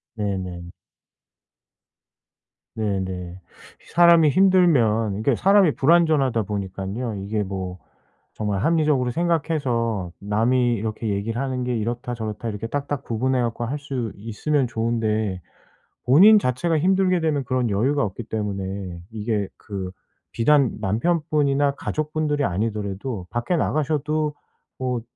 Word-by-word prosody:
네네. 95 -4 -4 2.0
네네. 95 -4 -3 0.5
사람이 170 -2 +6
힘들면 140 - +3
이게 120 +3 +2
사람이 195 - +4
불완전하다 145 -7 +3
보니깐요, 100 +3 -4
이게 105 +1 -2
뭐 95 -2 -4 0.6
정말 105 -3 -2
합리적으로 150 -6 +2
생각해서 130 - -1
남이 120 +4 +1
이렇게 110 +1 -4
얘기를 110 +5 -2
하는 130 -2 -2
게 125 0 -1
이렇다 120 +3 -3
저렇다 110 0 -4
이렇게 105 +2 -5
딱딱 145 +1 -3
구분해 125 +3 0
갖고 120 0 -2
할 145 +5 -3
수 130 -6 -4
있으면 125 +6 -1
좋은데 110 -4 -1 0.7
본인 200 - +7
자체가 155 +5 0
힘들게 185 0 +2
되면 145 -5 0
그런 125 -2 0
여유가 130 +8 +1
없기 105 +4 -4
때문에 100 -4 -4
이게 105 -2 -2
그 95 -3 -6 0.4
비단 140 +2 +3
남편분이나 145 - +1
가족분들이 150 -1 -2
아니더라도 100 0 -3
밖에 120 +9 -1
나가셔도 155 0 0 0.4
뭐 125 -2 -2
120 Hz, 285 characters per minute, -23 LUFS, 105-145 Hz, 2.0 s, 본인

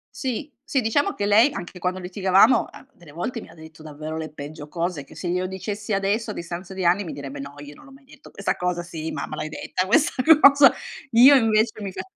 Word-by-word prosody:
Sì. 265 +3 -4
Sì 265 - 0
diciamo 285 - +1
che 205 - -3
lei, 225 +7 +5
anche 175 -4 -7
quando 180 +1 -2
litigavamo, 190 +5 +3
a - - -15
delle 170 - -17
volte 200 +9 -5
mi - - -13
ha - - -15
detto 160 -1 -14
davvero 155 +1 -7
le 155 -1 -6
peggio 150 +1 -9
cose 170 -3 -3
che 140 - -17
se 175 - -6
glielo 180 +1 -1
dicessi 200 +3 -6
adesso, 205 +3 -1
a - - -6
distanza 175 +2 -7
di 190 -1 -4
anni, 180 +4 +3
mi 165 - -7
direbbe: 140 -1 -8
"No, 140 +1 -8
io 145 0 -10
non - - -17
l'ho 275 - -16
mai 270 +1 -18
detto 280 - -16
questa - - -2
cosa." 180 -1 -2
"Sì, 160 -2 -6
mamma - - -5
l'hai 155 - -5
detta 185 +4 -3
questa 300 - +2 0.3
cosa." 280 0 +8 0.4
Io 255 +5 +8
invece 220 -3 +2
mi 195 - -5
fa - - -6
185 Hz, 230 wpm, -23 LUFS, 160-225 Hz, 0.4 s, cosa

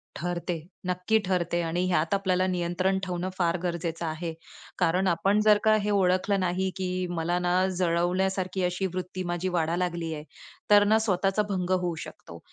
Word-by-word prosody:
ठरते, 175 +1 -3 0.3
नक्की 180 +4 +1
ठरते, 175 -2 0
आणि 170 +2 -1
ह्यात 170 -1 +1
आपल्याला 185 -2 +1
नियंत्रण 185 +1 0
ठेवणं 180 0 -3
फार 175 -1 +1
गरजेचं 170 -1 -2
आहे. 165 +1 -3 0.5
कारण 180 +4 +2
आपण 195 +4 +2
जर 210 -1 +6
का 215 0 +5
हे 210 - -1
ओळखलं 195 0 +2
नाही, 185 +1 0
की 185 -1 -2
मला 175 0 -1
ना 175 0 0 0.2
जळवण्यासारखी 185 +2 0
अशी 180 +2 0
वृत्ती 185 0 -4
माझी 175 +1 -2
वाढायला 170 0 0
लागली 170 -2 -4
आहे. 150 -1 -6 0.5
तर 205 0 +7
ना 215 +2 +4
स्वतःचा 195 -1 +1
भंग 185 -2 -2
होऊ 180 -2 +1
शकतो 85 - -12
180 Hz, 165 wpm, -27 LUFS, 175-190 Hz, 0.5 s, तर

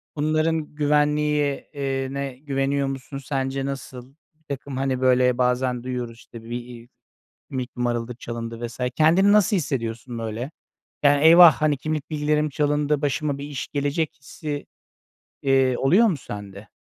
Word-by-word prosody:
Bunların 155 +1 0
güvenliği, 150 -1 +1
eee, 135 -1 -2
ne 140 -2 -4
güveniyor 140 -1 -1
musun 135 +1 -6
sence 135 0 -2
nasıl? 135 -1 -7 0.2
Birtakım 140 -3 -7
hani 130 -1 -1
böyle 125 -1 +4
bazen 125 0 +1
duyuyoruz 125 -2 -4
işte 115 -1 -12
bir, 115 - -12
iii, 120 0 -7 0.6
kimlik 130 -1 -5
numaraları 120 0 -1
çalındı 115 -1 -5
vs. 120 +2 -13 0.2
Kendini 170 +6 +5
nasıl 210 0 +4
hissediyorsun 120 - -3
böyle? 115 +5 -4 0.5
Yani 145 0 +4
eyvah, 170 0 +9
hani, 150 -2 +1
kimlik 155 +2 -3
bilgilerim 150 0 +1
çalındı, 145 0 0
başıma 145 0 -1
bir 140 - -7
iş 145 -3 -5
gelecek 145 +2 -1
hissi, 145 +1 -6 0.8
eee, 135 -2 +3
oluyor 185 +13 +5
mu 180 - 0
sende? 100 -4 -9
135 Hz, 140 wpm, -24 LUFS, 125-150 Hz, 0.8 s, eyvah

